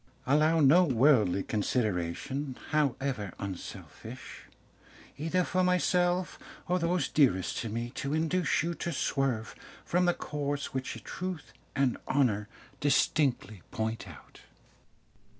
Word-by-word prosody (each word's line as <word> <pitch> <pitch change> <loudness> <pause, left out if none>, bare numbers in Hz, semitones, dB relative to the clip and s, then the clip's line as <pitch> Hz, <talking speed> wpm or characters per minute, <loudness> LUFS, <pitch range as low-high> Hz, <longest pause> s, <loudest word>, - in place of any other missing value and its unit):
"Allow 155 +4 +4
no 155 +6 +7
worldly 120 - +4
consideration, 110 - -2
however 135 - 0
unselfish, 95 -3 -8 0.7
either 165 +4 +1
for 185 +1 +1
myself 180 0 +1 0.3
or 180 +1 +1
those 170 -3 +1
dearest 110 - +2
to 115 - -3
me, 115 +2 -3
to 140 +4 -3
induce 165 +1 +1
you 170 +1 -1
to 170 - -4
swerve 130 -5 -1 0.3
from 180 +1 +2
the 175 - +3
course 145 -1 -3
which 130 -1 -4
truth 180 -4 -5 0.2
and 135 -3 +1
honour 115 -7 +2 0.3
distinctly 135 - +1
point 110 -1 -3
out. 80 -6 -14
140 Hz, 115 wpm, -30 LUFS, 115-165 Hz, 0.7 s, no